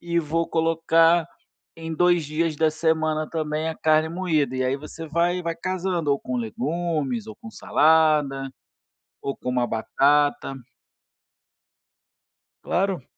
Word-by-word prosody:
e 170 Hz, 0 st, -1 dB
vou 165 Hz, +1 st, -1 dB
colocar 165 Hz, +1 st, +3 dB, 0.5 s
em 165 Hz, 0 st, -6 dB
2 175 Hz, -1 st, +3 dB
dias 155 Hz, +1 st, -1 dB
da 160 Hz, 0 st, +2 dB
semana 155 Hz, 0 st, 0 dB
também 155 Hz, 0 st, -2 dB
a 160 Hz, -, -3 dB
carne 155 Hz, 0 st, +2 dB
moída", 160 Hz, -6 st, -1 dB
e 130 Hz, -, 0 dB
aí 130 Hz, +1 st, +1 dB
você 155 Hz, +3 st, -9 dB
vai 175 Hz, +3 st, 0 dB
vai 170 Hz, 0 st, -2 dB
casando 180 Hz, -3 st, -2 dB
ou 140 Hz, -, +2 dB
com 125 Hz, 0 st, -4 dB
legumes 160 Hz, -, -2 dB
ou 220 Hz, -, -9 dB
com 225 Hz, -1 st, -11 dB
salada, 150 Hz, -7 st, +2 dB, 0.7 s
ou 140 Hz, -, -4 dB
com 125 Hz, -, -5 dB
uma 125 Hz, -1 st, 0 dB
batata. 140 Hz, +4 st, +1 dB, 2.1 s
Claro. 185 Hz, -5 st, -1 dB
160 Hz, 130 wpm, -24 LUFS, 150-170 Hz, 2.1 s, colocar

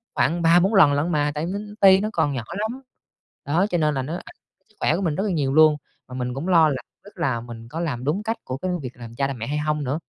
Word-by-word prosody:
khoảng 170 Hz, +1 st, +1 dB
3-4 175 Hz, +5 st, +4 dB
lần 150 Hz, -8 st, +6 dB
lận 145 Hz, +4 st, 0 dB
mà, 145 Hz, -1 st, +1 dB
tại 150 Hz, -, -2 dB
nó 190 Hz, +4 st, -3 dB, 0.2 s
ti, 190 Hz, -1 st, +7 dB
nó 215 Hz, -, -1 dB
còn 145 Hz, -, +1 dB
nhỏ 125 Hz, -4 st, -3 dB, 0.2 s
lắm. 230 Hz, +5 st, -3 dB, 0.6 s
Đó, 165 Hz, +7 st, +2 dB
cho 175 Hz, -, 0 dB
nên 150 Hz, -2 st, +1 dB
là 135 Hz, -, 0 dB
nó 140 Hz, +5 st, -5 dB
ảnh -, -, -10 dB, 0.3 s
sức 215 Hz, -, -29 dB
khỏe -, -, +2 dB
của 185 Hz, -, -2 dB
mình 165 Hz, -6 st, 0 dB
rất 195 Hz, -, -1 dB
là 205 Hz, -, -1 dB
nhiều 140 Hz, -5 st, 0 dB
luôn, 155 Hz, 0 st, +6 dB, 0.3 s
mà 125 Hz, -, -9 dB
mình 125 Hz, -1 st, -3 dB
cũng 140 Hz, +7 st, -5 dB
lo 165 Hz, -4 st, +5 dB
là 140 Hz, -, -1 dB, 0.3 s
tức 205 Hz, -, -16 dB
là 130 Hz, -9 st, -1 dB
mình 115 Hz, -1 st, -10 dB
có 160 Hz, -, -5 dB
làm 140 Hz, -8 st, -3 dB
đúng 160 Hz, +10 st, -1 dB
cách 225 Hz, +1 st, -2 dB
của 130 Hz, -, -5 dB
cái 185 Hz, +6 st, -3 dB
việc 125 Hz, -1 st, -8 dB
làm 115 Hz, -1 st, -10 dB
cha 135 Hz, +2 st, 0 dB
làm 135 Hz, -2 st, -5 dB
mẹ 115 Hz, -, -5 dB
hay 145 Hz, +2 st, -2 dB
hông 150 Hz, 0 st, -1 dB
nữa. 140 Hz, +4 st, -2 dB
150 Hz, 285 wpm, -23 LUFS, 135-180 Hz, 0.6 s, ti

